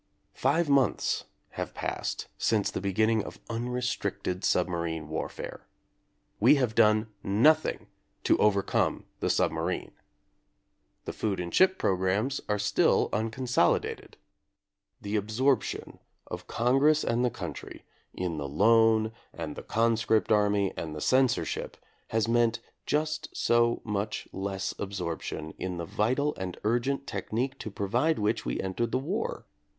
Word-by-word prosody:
Five 155 +5 +1
months 140 -5 +2 0.3
have - - -5
passed - - -3
since 105 -3 +1
the - - -4
be 100 0 -1
ginning 110 +2 +2
of - - -9
unrestricted 120 -5 -2
submarine 85 -3 0
warfare. 80 - -5 0.7
We - - +6
have 125 -5 +1
done 110 -1 +4
nothing 135 +12 +3 0.4
to - - +4
overcome 100 -2 +2
the - - 0
submarine. - - 0 1.1
The - - -4
food 100 -4 -2
and 85 -1 -4
ship 190 0 +5
programmes 95 +8 0
are 105 - +2
still 105 +1 +2
uncon 115 +4 -2
solidated. 105 -8 +1 0.8
The 105 +1 -2
absorption 110 +5 0 0.3
of - - -7
Congress 135 +6 +3
and 120 +1 +1
the 125 - +3
country 90 - -7 0.3
in 90 -3 -3
the 70 -1 -4
loan 110 +6 +4 0.2
and 80 -3 -6
the - - -7
conscript 115 -1 +1
army 105 -2 +3
and 80 -1 -5
the - - -5
censorship 130 -1 +1 0.3
has 110 0 0
meant 115 -1 +2 0.3
just 155 +1 -1
so 120 0 +3
much 105 0 -3
less 95 0 -3
absorp 90 -5 -3
tion 80 0 -5
in 90 -1 -3
the 85 - -4
vital 130 - 0
and 95 -2 -5
urgent 120 +5 0
technique 130 +4 -3
to - - -5
provide 120 +11 0
which 105 +2 0
we - - -2
entered 100 +5 -2
the - - +2
war. 180 - -3
110 Hz, 135 wpm, -28 LUFS, 95-125 Hz, 1.1 s, We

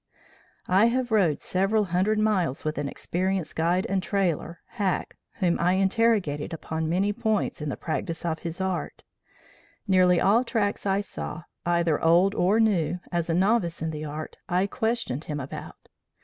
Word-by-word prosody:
"I 195 +5 +5
have 245 0 -1
rode 185 -9 +2
several 195 +4 +1
hundred 190 +3 +1
miles 190 -11 0
with 155 -1 -1
an 145 - -2
experienced 185 +2 -2
guide 175 +3 +1
and 195 0 0
trailer, 175 -4 -1
Hack, 200 -6 -2 0.2
whom 175 -2 0
I 180 +2 +3
interrogated 195 -6 +1
upon 160 0 -3
many 195 +5 +1
points 215 -5 -1
in 150 - -2
the - - -4
practice 165 +1 -3
of 160 -1 -2
this 170 +1 -5
art. 190 -2 -3 0.8
Nearly 180 -2 +4
all 220 +6 +4
tracks 210 -5 -1
I 195 +1 +2
saw, 175 -4 -6 0.2
either 170 -3 +1
old 175 +4 +5
or 200 +3 +2
new, 180 -6 +2
as 170 -1 -1
a 165 - +2
novice 185 -3 +1
in 160 - -1
the 155 -1 -5
art, 155 +1 -7
I 180 +2 +2
questioned 220 - -2
him 150 -1 -4
about. 130 0 -8
180 Hz, 165 wpm, -26 LUFS, 165-205 Hz, 0.8 s, I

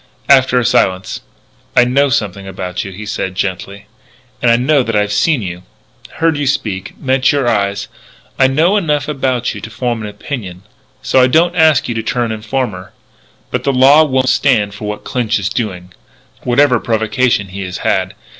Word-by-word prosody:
After 130 -2 +5
a 125 - +2
silence: 95 -3 0 0.5
"I 125 - +6
know 140 +3 +2
something 100 -7 -2
about 90 -1 -5
you," 95 - -7
he 100 +3 -8
said 95 -3 -4
gently. 100 +2 -4 0.6
"And 120 +1 +3
now 150 -1 +4
that 115 -3 -2
I've 105 0 +1
seen 125 +4 +1
you 90 -1 -6 0.5
heard 165 -2 +1
you 145 -1 -1
speak 105 -7 -3
met 130 -1 +2
your 140 -4 0
eyes 100 -3 0 0.5
I 135 - +6
know 160 +9 +2
enough 150 -7 0
about 130 -4 -1
you - - -8
to - - -7
form 120 0 -3
an 105 - -5
opinion.... 100 -6 -7 0.4
So 130 - +3
I 125 - +5
don't 170 +6 +2
ask 160 -5 +4
you 120 - -2
to 115 - -2
turn 115 +1 -1
informer. 110 -4 -4 0.6
But - - -2
the 140 - +1
law 135 +4 +6
won't 130 -3 +1
stand 105 -7 +2
for 105 +1 -8
what 105 0 -5
Clinch 120 -2 -1
is 100 -1 -2
doing 90 -6 -4 0.5
whatever 125 0 +3
provocation 110 -1 0
he 100 +2 -7
has 90 -1 -5
had. - - 0
120 Hz, 180 wpm, -15 LUFS, 100-135 Hz, 0.6 s, I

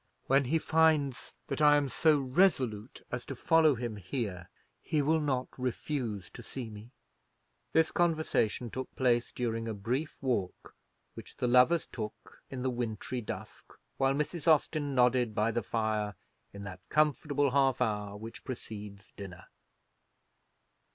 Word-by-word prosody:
When 135 +1 +3
he 155 +6 +2
finds 155 -5 +2
that - - -3
I 145 -1 +7
am 145 -1 +1
so 155 +3 +3
resolute 130 - +1
as 125 -1 -3
to 135 - -5
follow 155 +2 +4
him 115 -2 -4
here, 95 - -4 0.3
he 155 - 0
will 160 +3 +3
not 135 -4 -1
refuse 125 -5 -3
to - - -10
see 120 -4 -7
me." 105 +2 -10 0.8
This 160 0 +3
conversation 155 -9 +1
took 130 0 -6
place 120 -2 +2
during 115 -2 -2
a 110 - -3
brief 125 +10 -2
walk 120 -9 -2 0.4
which - - -11
the 125 - 0
lovers 125 +7 +5
took 110 -2 -8
in 130 -2 -5
the 130 - +1
wintry 120 +1 -3
dusk, 105 - -8 0.2
while 135 0 +2
Mrs. 150 +3 -2
Austin 150 -2 +3
nodded 125 -3 +3
by 110 +1 +2
the 120 +1 -1
fire 110 -2 -1 0.4
in 100 0 -9
that 95 -2 -7
comfortable 145 -2 +2
half 135 -1 +3
hour 105 -4 -1
which 110 +2 -9
precedes 105 -5 -8
dinner. 95 -3 -9
125 Hz, 145 wpm, -31 LUFS, 110-145 Hz, 0.8 s, I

